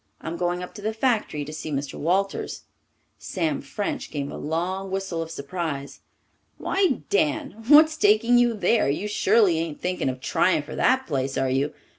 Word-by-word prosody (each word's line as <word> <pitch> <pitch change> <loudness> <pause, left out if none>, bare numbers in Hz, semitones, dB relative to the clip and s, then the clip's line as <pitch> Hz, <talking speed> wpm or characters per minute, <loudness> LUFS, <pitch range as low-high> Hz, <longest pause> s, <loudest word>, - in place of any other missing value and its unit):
I'm 160 - -5
going 175 +1 -1
up 180 - -9
to 210 - -10
the 215 +2 -2
factory 220 - 0
to 155 - -8
see 155 - -6
Mr. 140 -1 -3
Walters." 190 +5 -1 0.6
Sam 160 -7 -2
French 200 +9 -4
gave 140 -1 -4
a - - -7
long 180 +5 -3
whistle 190 -3 -3
of 165 - -5
surprise. 140 -2 -5 0.6
"Why, 370 - +1
Dan, 200 +5 0
what's 310 +2 +7
taking 230 +1 +4
you 240 -1 +3
there? 215 -4 +2
You 170 +9 -1
surely 205 -4 +3
ain't 165 -2 -4
thinking 180 -6 -1
of 130 0 -5
trying 150 +4 +1
for 155 - -8
that 260 0 +2
place, 135 -3 -2
are 135 -1 +1
you? 140 +3 0
175 Hz, 175 wpm, -24 LUFS, 150-210 Hz, 0.6 s, what's